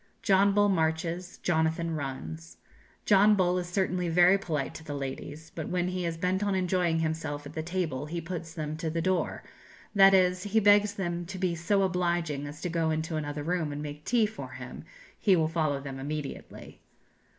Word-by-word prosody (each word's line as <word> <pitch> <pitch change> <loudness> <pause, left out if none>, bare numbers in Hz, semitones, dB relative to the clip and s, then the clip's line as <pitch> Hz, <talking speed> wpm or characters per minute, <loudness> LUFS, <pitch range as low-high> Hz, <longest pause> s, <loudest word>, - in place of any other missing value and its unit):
John 195 +1 +4
Bull 205 0 +5
marches, 170 0 -1
Jonathan 160 0 +1
runs. 80 - -6 0.5
John 210 +1 +6
Bull 180 -2 +2
is 175 - -4
certainly 180 -1 0
very 175 +3 +6
polite 160 -8 -2
to 160 - -9
the 150 -2 -5
ladies, 145 +3 -6
but 160 - -5
when 180 0 0
he 180 -1 -2
is 165 -1 -3
bent 185 +3 0
on 200 -1 +1
enjoying 180 -3 +1
himself 155 -2 -3
at 145 - -9
the 160 - -3
table, 160 -5 -2
he 170 +2 -3
puts 165 -1 -6
them 155 -2 -3
to 165 0 -2
the 165 +1 -2
door 185 0 0 0.5
that 195 -1 +7
is, 180 -1 +3
he 205 +3 +1
begs 205 0 +5
them 175 -3 -3
to 190 +1 -6
be 180 -2 0
so 195 +4 +1
obliging 170 -6 0
as 145 +1 -9
to - - -2
go 165 -1 0
into 160 +1 -2
another 145 -1 -3
room 165 -2 -1
and 145 +1 -5
make 150 0 -7
tea 230 +2 +3
for 220 +1 -7
him, - - -9 0.3
'he 195 -3 +4
will 160 -2 +2
follow 155 -3 0
them 135 -1 -7
immediately.' 145 +1 -6
170 Hz, 195 wpm, -29 LUFS, 155-185 Hz, 0.5 s, that